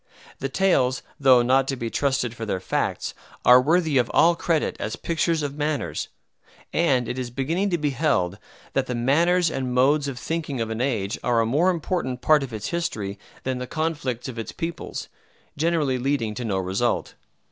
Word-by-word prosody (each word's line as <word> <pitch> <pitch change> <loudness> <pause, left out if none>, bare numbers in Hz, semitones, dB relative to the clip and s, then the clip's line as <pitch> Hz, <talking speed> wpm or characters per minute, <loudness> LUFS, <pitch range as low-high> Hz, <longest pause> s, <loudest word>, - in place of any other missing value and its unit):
The 135 - -2
tales, 130 -7 +2 0.2
though 130 -3 +6
not 135 +2 +3
to 135 - -1
be 115 -2 -4
trusted 130 -4 0
for 115 - -7
their 100 -4 -2
facts, - - -2 0.3
are 125 +1 +8
worthy 160 -1 +3
of 120 - +1
all 170 +1 +6
credit 165 -2 0
as - - -3
pictures 165 -1 0
of 145 -1 -2
manners; 150 -2 -2 0.7
and 135 -8 +2
it 120 +2 -3
is 125 -1 -3
beginning 160 +11 -1
to 175 - +1
be 150 -2 0
held 115 - 0 0.3
that 135 -1 0
the 125 - -2
manners 165 +8 +3
and 130 -3 -2
modes 140 +3 +3
of 135 -3 -4
thinking 150 -2 -3
of 115 -1 -2
an 110 +1 -2
age 110 -7 -1
are 120 -2 +2
a 115 - +3
more 150 +11 +3
important 165 -7 -1
part 155 -1 +5
of 135 -2 -5
its 110 -2 -4
history 105 - -3 0.2
than 130 -1 -2
the 125 - -5
conflicts 150 -7 -2
of 125 -3 -6
its 115 - -5
peoples, 170 -1 -5 0.5
generally 150 -5 +1
leading 125 -4 0
to 120 +3 -5
no 100 -4 0
result. 95 +6 -1
135 Hz, 190 wpm, -24 LUFS, 120-155 Hz, 0.7 s, are